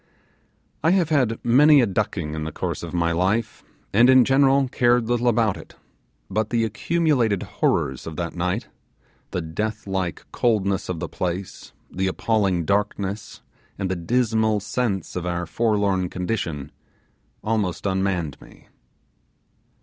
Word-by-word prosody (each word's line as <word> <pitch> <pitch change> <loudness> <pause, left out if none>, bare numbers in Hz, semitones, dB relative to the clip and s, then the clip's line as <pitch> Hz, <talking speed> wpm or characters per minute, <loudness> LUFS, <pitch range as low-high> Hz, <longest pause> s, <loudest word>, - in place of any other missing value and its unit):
I 160 - +4
have 170 -4 +1
had 130 -7 +2
many 145 +5 +6
a 125 - +4
ducking 95 -6 -2
in 80 0 -4
the 80 - -4
course - - -4
of 85 - -6
my 85 -1 +1
life, 95 +6 0 0.3
and 120 +5 +6
in 130 -2 +7
general 135 0 +4
cared 120 -2 +2
little 120 0 +1
about 110 -3 +2
it; - - -13 0.5
but 105 +2 -1
the 115 -1 +1
accumulated 125 - +1
horrors 65 +2 -1
of 80 - -6
that 85 0 -3
night, 90 +5 -2 0.6
the 90 - -3
deathlike 95 0 -3
coldness 100 -6 0
of 90 -3 -3
the 85 - -3
place, 90 +3 -5 0.2
the 95 +1 -1
appalling 95 -3 0
darkness 100 +1 -2 0.3
and 95 -2 -2
the - - 0
dismal 110 +3 +1
sense 105 -2 -2
of 90 -1 -3
our 85 0 -2
forlorn 100 -1 0
condition, 90 -7 -3 0.7
almost 105 -5 -1
unmanned 95 -6 -1
me. - - -17
100 Hz, 140 wpm, -23 LUFS, 90-115 Hz, 0.7 s, in